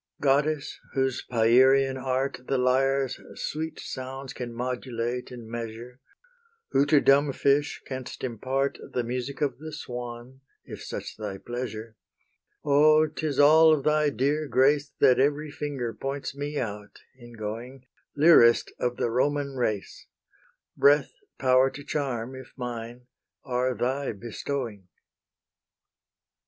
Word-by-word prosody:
Goddess, 145 +1 +1 0.2
whose 130 -1 0
Pierian 130 +4 +4
art 130 0 -2
The 135 - +1
lyre's 135 +1 +1 0.2
sweet 160 +1 -4
sounds 130 +1 -6
can 120 -1 -6
modulate 125 0 -3
and 120 -3 -10
measure, 115 +2 -7 0.7
Who 140 +2 +3
to 145 -1 +5
dumb 140 +1 +4
fish 140 +3 +1
canst 130 -2 -7
impart 130 +3 -2
The 125 - 0
music 125 +4 -4
of 145 -2 -1
the 155 +1 -7
swan, 125 -2 -7 0.2
if - - -9
such - - -6
thy 105 -3 -5
pleasure: 115 0 -6 0.7
O, 155 +2 +5
'tis 155 -2 -3
all 160 +2 +7
of 145 -3 0
thy 150 0 +3
dear 145 +3 0
grace 140 +3 +3
That 125 - +5
every 145 +2 +1
finger 135 -6 -4
points 135 0 -5
me 145 +1 -4
out 105 -4 -5
in 120 -2 -14
going 115 +4 -7 0.3
Lyrist 145 -7 +6
of 120 0 -1
the 115 - 0
Roman 140 +2 0
race; 110 -6 -3 0.7
Breath, 145 -1 +4 0.2
power 130 0 +4
to 145 - -10
charm, 130 -5 -3
if 130 0 -11
mine, 120 0 -6 0.4
are 125 0 -1
thy 130 +2 -1
bestowing! 115 -1 -5
130 Hz, 125 wpm, -27 LUFS, 120-140 Hz, 0.7 s, all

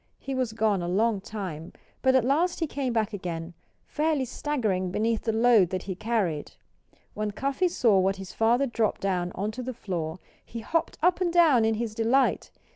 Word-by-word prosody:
He 275 - -6
was 255 -4 -1
gone 215 -4 +1
a 175 - -3
long 205 +3 +1
time. 190 -7 -6 0.3
But 260 0 +3
at 255 -3 +3
last 325 +7 +1
he 330 - +1
came 275 -4 -3
back 225 -2 0
again, 170 -3 -5 0.3
fairly 300 -3 0
staggering 225 -9 -1
beneath 220 +4 0
the 225 - +2
load 225 -5 +4
that 185 0 -3
he 190 - -4
carried. 185 -7 -2 0.6
When 215 0 -2
Cuffy 275 - 0
saw 230 - +3
what 190 +1 +2
his 195 -1 -9
father 235 +4 +2
dropped 230 -4 -1
down 180 -2 -1
onto 215 +6 -3
the 255 0 -5
floor 170 -7 -4 0.3
he 230 - -8
hopped 330 +8 -1
up 360 +1 +3
and 350 -2 +1
down 315 -10 +5
in 220 0 +2
his 225 -1 -3
delight. 235 +5 +1
225 Hz, 190 wpm, -27 LUFS, 195-260 Hz, 0.6 s, down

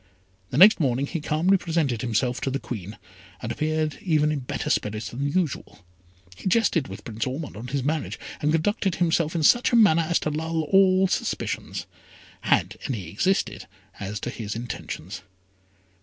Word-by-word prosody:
The - - -3
next 205 +3 +8
morning 135 -3 +1
he 165 +2 -4
calmly 165 +6 +2
presented 160 - -1
himself 125 +1 0
to - - -1
the 135 - -1
Queen, 105 -6 -7 0.4
and 110 - -4
appeared 155 +3 -1
even 155 -4 +2
in 150 - -1
better 125 - -3
spirits 105 +1 -1
than 140 +4 -2
usual. 150 - -2 0.5
He - - -6
jested 190 -8 +2
with - - -9
Prince 115 +1 -3
Ormond 140 +1 -5
on 115 +4 -7
his 135 0 -2
marriage, 155 +2 -2 0.2
and 150 - +2
conducted 190 +3 +1
himself 165 -2 +1
in 165 - 0
such 240 +10 +5
a - - +3
manner 200 -8 +6
as 170 - +3
to 155 - -1
lull 160 +1 -1
all 190 +2 +4
suspicions, - - -3 0.6
had - - +1
any 100 - -4
existed 185 - 0 0.3
as 100 +1 -4
to 120 - -3
his 110 -3 -5
intentions. 110 -5 -6
150 Hz, 170 wpm, -25 LUFS, 120-170 Hz, 0.6 s, next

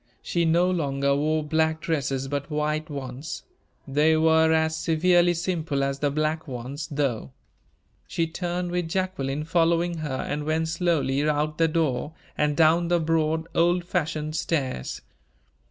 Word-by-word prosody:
She 170 -1 0
no 170 +3 +3
longer 140 -5 0
wore 155 +2 +1
black 160 +1 +1
dresses, 135 -4 -1
but 140 +1 -3
white 150 +1 -1
ones. 135 0 -6 0.4
They 150 +3 +3
were 160 0 +4
as 160 0 +2
severely 175 +2 +3
simple 165 -5 -1
as 135 0 -1
the 145 - +1
black 155 +2 -1
ones, 135 +4 -5
though. 135 - -2 0.7
She 165 - 0
turned 175 +1 -3
with 175 -1 -1
Jacqueline 150 -6 -2
following 170 +1 +1
her, 150 -4 -3
and 150 0 -2
went 160 +1 0
slowly 155 -4 +1
out 150 +1 -1
the 165 - +5
door, 155 -2 -1 0.2
and 150 -1 0
down 165 +1 +4
the 175 0 +2
broad, 160 0 0
old 175 +1 +2
fashioned 155 -3 -2
stairs. 135 - -2
155 Hz, 145 wpm, -25 LUFS, 145-165 Hz, 0.7 s, the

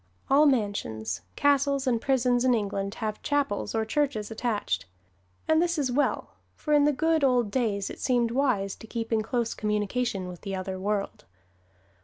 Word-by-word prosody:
All 295 +2 +6
mansions, 110 - -1
castles 280 -1 +2
and 235 -3 +1
prisons 250 -2 +2
in 255 -1 +4
England 200 -1 -2
have 215 -2 -4
chapels 280 -8 -1
or 220 0 +1
churches 230 -4 -1
attached. 220 - -2 0.6
And 315 0 +4
this 345 -1 +1
is 275 -4 0
well, 285 +4 0 0.2
for 300 - -2
in 290 -1 +5
the 295 - +4
good 320 +2 +1
old 245 -5 +3
days 210 -6 0
it - - -10
seemed 240 -3 +1
wise 235 -7 +1
to 225 - -12
keep 225 0 -3
in 220 - +3
close 230 +1 -1
communication 210 -1 -1
with 180 -1 -9
the 195 -2 -4
other 185 0 -4
world. 200 +1 -2
235 Hz, 170 wpm, -27 LUFS, 205-275 Hz, 0.6 s, All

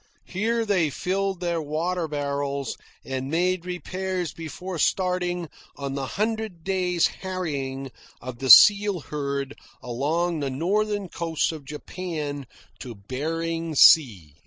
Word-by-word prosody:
Here 225 +4 -1
they 185 -7 +2
filled 190 +4 -2
their 170 -2 -1
water 165 +3 -2
barrels 140 -2 -2 0.3
and 130 0 -4
made 180 +2 0
repairs 185 -1 -3
before 165 +2 -6
starting 180 0 0 0.3
on 140 -1 -4
the 135 -1 -3
hundred 215 -5 -2
days' 180 -2 +1 0.2
harrying 140 -8 -4 0.3
of 125 -1 -8
the 130 - -3
seal 200 - +8
herd 140 -1 -3 0.3
along 155 +7 -1
the 140 -2 -2
northern 200 +8 0
coasts 165 -2 -1
of 155 -4 -9
Japan 150 -2 -5 0.3
to 120 -3 -8
Behring 165 +9 -3
Sea. 105 - +6
165 Hz, 120 wpm, -25 LUFS, 140-185 Hz, 0.3 s, seal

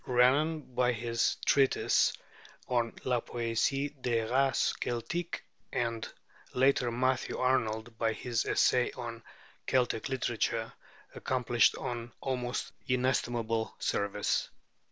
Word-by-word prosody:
Renan 140 +6 +3
by 125 0 +2
his 115 0 0
treatise 135 -1 +4 0.6
on 120 -2 +1
'La 125 -2 +1
Poésie 120 +5 -1
des 115 -2 +1
Races 135 +4 +2
Celtiques,' 165 +9 -2 0.3
and 115 -2 -2 0.4
later 130 -1 +3
Matthew 130 +2 0
Arnold 115 -3 0
by 115 -1 +2
his 115 +1 -1
essay 125 -1 +3
on 115 -1 -6 0.5
'Celtic 125 -1 +1
Literature,' 115 -3 -1 0.4
accomplished 120 -3 +2
an 120 -1 -4
almost 125 -2 -2 0.2
inestimable 120 -3 0
service. 100 0 0
120 Hz, 100 wpm, -31 LUFS, 115-130 Hz, 0.6 s, treatise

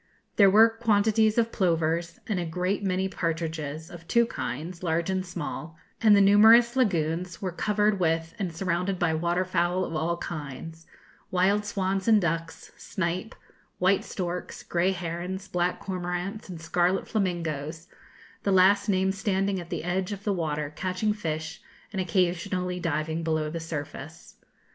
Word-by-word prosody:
There 200 -2 +7
were 220 +4 +7
quantities 220 -1 +2
of 230 -1 +2
plovers, 170 -2 0
and 200 -4 -1
a - - -1
great 180 +5 -1
many 190 0 0
partridges, 160 -3 -3
of 170 -2 -11
two 235 +3 +4
kinds, 170 - -5
large 170 +1 0
and 185 0 0
small, 165 -2 -6 0.2
and 215 -2 +7
the 200 - +6
numerous 220 +4 +7
lagunes 175 -6 0
were 185 -2 -3
covered 210 +2 +1
with 165 -1 0
and 190 -4 -2
surrounded 180 +2 -1
by 175 -2 +1
water 170 +3 0
fowl 180 0 +1
of 165 - -5
all 165 +2 0
kinds 160 +1 -7 0.4
wild 195 +3 +2
swans 195 -1 -1
and 220 -2 +6
ducks, 165 -2 -3
snipe, 185 +3 -3 0.4
white 185 +2 +3
storks, 180 -1 -5
grey 175 +2 +1
herons, 180 +2 -4
black 180 -1 0
cormorants, 180 +2 -4
and 175 -3 -7
scarlet 175 +3 +1
flamingoes, 165 -5 -2 0.5
the 200 - 0
last 200 +2 +5
named 190 0 +2
standing 195 -1 0
at 170 -1 -9
the 170 -3 -3
edge 180 +3 -1
of 200 -1 -6
the 205 - +1
water, 150 -4 -2
catching 185 +4 -1
fish, 160 -5 -4 0.3
and 190 - -1
occasionally 180 +1 0
diving 160 -1 -1
below 155 -2 -1
the 165 - -4
surface. 160 -1 -7
180 Hz, 155 wpm, -27 LUFS, 165-195 Hz, 0.5 s, There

